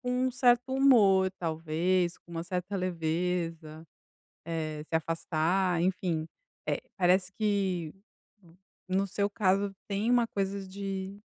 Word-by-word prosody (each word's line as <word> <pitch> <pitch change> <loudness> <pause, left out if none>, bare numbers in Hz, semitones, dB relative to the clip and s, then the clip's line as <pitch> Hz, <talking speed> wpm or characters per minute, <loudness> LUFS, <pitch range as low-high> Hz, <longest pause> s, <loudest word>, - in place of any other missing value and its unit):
com 250 - -5 0.2
um - - -3
certo 245 0 +3
humor 205 -9 +5
talvez, 170 +2 0
com - - -22
uma 165 0 -4
certa 180 +2 -3
leveza. 165 -2 -2 0.6
Eh, 155 -2 -3
se - - -2
afastar 165 +2 0
enfim, 175 -3 0 0.4
eh, - - 0 0.2
parece 185 0 +3
que, 190 -6 0 1.0
no 190 +1 +1
seu 200 +2 0
caso, 195 0 +1
tem 205 +4 0
uma 240 -1 +4
coisa 195 -2 -3
de 195 0 -5
185 Hz, 125 wpm, -29 LUFS, 165-200 Hz, 1.0 s, humor